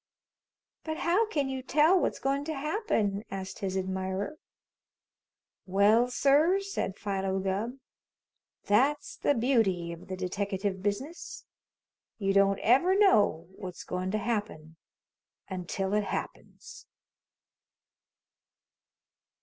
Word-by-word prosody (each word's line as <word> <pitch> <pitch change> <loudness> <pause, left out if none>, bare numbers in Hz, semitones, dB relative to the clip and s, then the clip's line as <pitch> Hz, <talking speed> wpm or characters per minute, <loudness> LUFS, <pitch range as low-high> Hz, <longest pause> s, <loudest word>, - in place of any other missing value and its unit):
"But 315 0 -4
how 365 +7 +2
can 290 -10 -1
you 265 -1 -3
tell 305 +8 +4
what's - - 0
goin' 275 +1 -1
to 315 0 -3
happen?" 270 - -1
asked 190 -1 -6
his 190 -1 -2
admirer. 190 +8 -3 1.3
"Well, 210 +6 +4
sir," 290 +9 +3
said 395 - -4
Philo 195 -2 -2
Gubb, 195 +6 -2 0.9
"that's 265 +9 +2
the 285 - +2
beauty 220 -9 +1
of 170 - -12
the 185 -1 -5
deteckative 190 +1 -2
business. 235 - -4 0.7
You 195 -2 0
don't 195 0 +4
ever 340 - +4
know 210 - +4
what's 180 -2 -8
goin' 185 +1 -3
to 215 - 0
happen 205 -8 -3 0.7
until 190 +1 -3
it 210 -1 +1
happens." - - -7
205 Hz, 110 wpm, -29 LUFS, 190-280 Hz, 1.3 s, tell